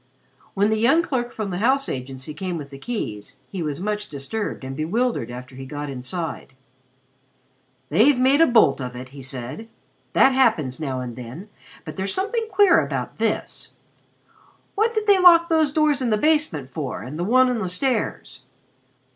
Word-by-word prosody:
When 205 +2 +2
the 220 - +1
young 275 +9 +4
clerk 245 -6 -2
from 210 -3 -4
the 180 - -3
house 270 +5 +2
agency 130 +3 -6
came 180 +2 -4
with 145 -2 -8
the 135 - -10
keys, 110 - -5 0.2
he 190 - -4
was 150 -2 -3
much 210 +2 -3
disturbed 145 +7 -4
and 135 0 -6
bewildered 185 - -1
after 125 +1 -9
he 135 - -8
got 145 +1 -5
inside. 135 +3 -5 1.4
"They've 230 - +4
made 265 +4 +4
a 330 - +7
bolt 220 - +4
of 125 -1 -5
it," 130 +1 -8
he 140 +1 -11
said. 135 - -7 0.5
"That 270 - +6
happens 220 - +2
now 135 -5 -3
and 120 -2 -6
then, 125 - -9 0.4
but - - -8
there's 190 +1 -1
something 445 +4 -1
queer 385 -4 +5
about - - -4
this. - - -2 1.0
What 450 +3 +1
did 435 -1 0
they 400 -2 +5
lock 340 -2 +7
these 315 -3 +3
doors 300 -3 +2
in 250 - 0
the 215 - +2
basement 295 - 0
for, 145 -6 -5
and 145 +5 -7
the - - 0
one 255 +6 +4
on 250 -2 0
the 190 -4 -2
stairs? 220 - -2
200 Hz, 180 wpm, -23 LUFS, -, 1.4 s, a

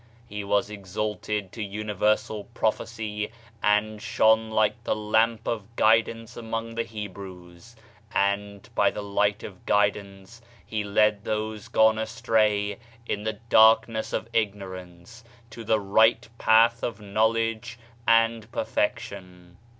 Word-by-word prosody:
He 105 -2 -6
was 100 +1 0
exalted 105 0 -4
to 115 - -7
universal 105 +1 -1
prophecy, 110 -1 -2 0.3
and 105 +1 +1
shone 110 0 +3
like 110 +1 +1
the - - 0
lamp 110 +2 +1
of 115 0 -4
guidance 115 +1 +2
among 115 0 -5
the 115 - -1
Hebrews; 95 -2 -9 0.4
and 100 +1 -1
by 100 -3 +3
the 105 - -6
light 100 +1 0
of 95 -3 -10
guidance 100 +1 -1 0.2
he 110 -1 -3
led 105 0 +2
those 110 -1 -3
gone 110 0 +4
astray 110 -3 0 0.3
in 105 - -2
the 110 +1 -2
darkness 110 0 +3
of - - -3
ignor 100 -4 -1
ance 90 +6 -13 0.3
to 115 - -9
the 110 0 +2
right 110 +3 +3
path 115 +1 +4
of 115 -3 -3
knowledge 115 +3 -1 0.3
and 115 0 +3
perfec - - 0
tion. 90 -1 -11
110 Hz, 125 wpm, -26 LUFS, 100-115 Hz, 0.4 s, gone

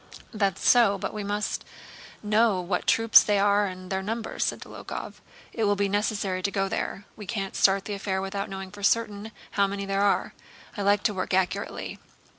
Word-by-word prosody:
"That's 200 -4 0
so. 230 -5 +5
But - - -4
we 210 -1 -4
must 205 +1 -2 0.6
know 210 -1 +3
what 180 0 -2
troops 225 0 +7
they 205 -1 +1
are 205 +1 +3
and 185 0 -8
their 190 0 0
numbers," 220 +3 -2
said - - -2
Dólokhov. - - -8 0.3
"It 225 - 0
will 205 0 +3
be 200 0 +1
necessary 205 -2 -1
to 200 - 0
go 195 -1 0
there. 195 +1 -3
We 210 -3 -10
can't 195 -4 -3
start 195 0 +3
the 210 - -4
affair 195 -1 -2
without 200 +1 -3
knowing 190 -1 -6
for 205 - -11
certain 215 0 0 0.2
how 200 -1 +2
many 200 0 -4
there 195 0 0
are. 200 -1 +1 0.4
I 205 - -4
like 205 +1 +3
to 220 - +2
work 185 -1 -1
accurately. 190 -1 -2
200 Hz, 195 wpm, -26 LUFS, 195-210 Hz, 0.6 s, troops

